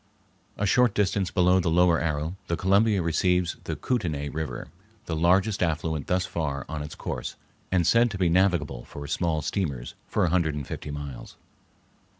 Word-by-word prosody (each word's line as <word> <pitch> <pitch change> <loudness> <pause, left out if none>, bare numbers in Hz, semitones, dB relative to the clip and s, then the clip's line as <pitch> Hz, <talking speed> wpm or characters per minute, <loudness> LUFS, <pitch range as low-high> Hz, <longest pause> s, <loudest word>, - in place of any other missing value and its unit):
A 105 - 0
short 120 +2 +3
distance 100 -2 +1
below 90 0 +4
the 85 -2 0
Lower 85 0 +4
Arrow 80 +2 -2
the 85 - -1
Columbia 100 +1 +3
receives 90 +1 +1
the - - -3
Kootenay 80 - -2
River, 80 +1 -5 0.4
the 80 - -3
largest 95 +6 +2
affluent 80 -3 -1
thus 90 0 +1
far 75 -4 -3
on 80 -1 -4
its 75 +1 -7
course - - -5 0.4
and 90 -3 +2
said 115 +5 +4
to 100 - -5
be 90 -1 +2
navigable 85 -8 +2
for 70 - -8
small 80 0 -1
steamers 70 - -2
for - - +1
a - - +1
hundred 85 -4 +1
and 75 -2 -4
fifty - - -6
miles. 70 -3 -7
85 Hz, 170 wpm, -26 LUFS, 75-95 Hz, 0.4 s, below